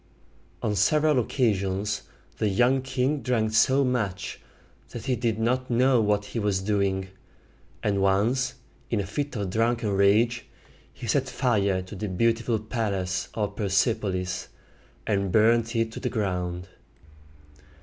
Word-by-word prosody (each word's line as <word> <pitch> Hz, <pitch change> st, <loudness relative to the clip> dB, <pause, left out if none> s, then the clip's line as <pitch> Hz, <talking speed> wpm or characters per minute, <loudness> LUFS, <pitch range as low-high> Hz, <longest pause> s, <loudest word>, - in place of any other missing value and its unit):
On 105 Hz, -, +1 dB
several 150 Hz, +8 st, +3 dB
occasions 105 Hz, -5 st, 0 dB, 0.4 s
the 110 Hz, -, +2 dB
young 125 Hz, +7 st, +3 dB
king 130 Hz, +2 st, -1 dB
drank 110 Hz, -4 st, 0 dB
so 130 Hz, +5 st, +4 dB
much 110 Hz, -7 st, -2 dB, 0.5 s
that 120 Hz, -1 st, -8 dB
he 130 Hz, -2 st, +1 dB
did 115 Hz, -2 st, -1 dB
not 125 Hz, +3 st, 0 dB
know 125 Hz, 0 st, +4 dB
what 105 Hz, -1 st, +1 dB
he 115 Hz, -, -4 dB
was 105 Hz, -3 st, +1 dB
doing; 95 Hz, -2 st, 0 dB, 0.7 s
and 100 Hz, -1 st, +1 dB
once, 110 Hz, +7 st, +1 dB, 0.3 s
in 115 Hz, -, 0 dB
a 100 Hz, -, -1 dB
fit 140 Hz, +8 st, -3 dB
of 100 Hz, -4 st, -3 dB
drunken 115 Hz, 0 st, +1 dB
rage, 105 Hz, +5 st, +3 dB, 0.4 s
he -, -, -9 dB
set -, -, +1 dB
fire 100 Hz, -7 st, +1 dB
to 95 Hz, +3 st, -10 dB
the 105 Hz, +1 st, -4 dB
beautiful 115 Hz, +4 st, +1 dB
palace 100 Hz, -5 st, -2 dB
of 105 Hz, -2 st, -2 dB
Per 105 Hz, -, -2 dB
sep´o 100 Hz, +2 st, +1 dB
lis, 90 Hz, 0 st, -3 dB, 0.6 s
and 100 Hz, -2 st, 0 dB
burned 115 Hz, +2 st, +3 dB
it 115 Hz, -1 st, +1 dB
to -, -, -7 dB
the -, -, -2 dB
ground. 90 Hz, -5 st, -2 dB
110 Hz, 145 wpm, -26 LUFS, 100-120 Hz, 0.7 s, so